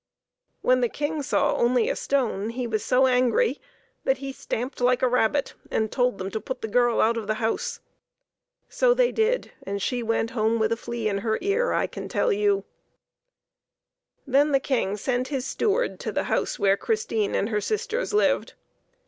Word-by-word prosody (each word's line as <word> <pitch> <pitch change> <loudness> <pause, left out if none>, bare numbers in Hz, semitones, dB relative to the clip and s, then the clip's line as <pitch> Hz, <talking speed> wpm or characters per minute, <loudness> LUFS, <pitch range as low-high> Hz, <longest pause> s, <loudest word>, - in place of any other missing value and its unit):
When 255 0 +3
the 240 - +2
King 295 +3 -2
saw 275 - +1
only 240 -1 +2
a - - 0
stone 230 -7 -1
he 245 +2 -3
was 220 -2 -2
so 260 +1 +3
angry 255 - +2 0.4
that 265 - +2
he 270 0 -6
stamped 250 +1 -4
like 250 +1 +2
a - - +5
rabbit 250 +3 +1 0.2
and 220 -1 -1
told 250 -4 +1
them 190 +1 -5
to 220 - -3
put 260 +3 -6
the - - -1
girl 240 +1 +2
out 230 +1 +3
of 220 -3 -4
the 215 - 0
house. 470 - -2 0.9
So - - +2
they - - +3
did, 460 +3 0
and 200 +1 -4
she 245 +5 -1
went 225 0 0
home 225 0 +1
with 220 0 +1
a - - +3
flea 230 -1 -4
in 200 -1 0
her 220 +1 0
ear, 445 +5 +1
I - - +1
can - - -7
tell 475 - +1
you. 410 -1 +1 1.6
Then 285 +2 +3
the 275 - +5
King 235 -7 -1
sent 250 +4 -1
his 270 -3 -3
steward 450 - 0
to - - -4
the - - -1
house - - -1
where 200 -2 +3
Christine 425 - -1
and 205 - 0
her 210 -2 0
sisters 460 - -2
lived. 420 - +1
250 Hz, 190 wpm, -25 LUFS, 220-300 Hz, 1.6 s, a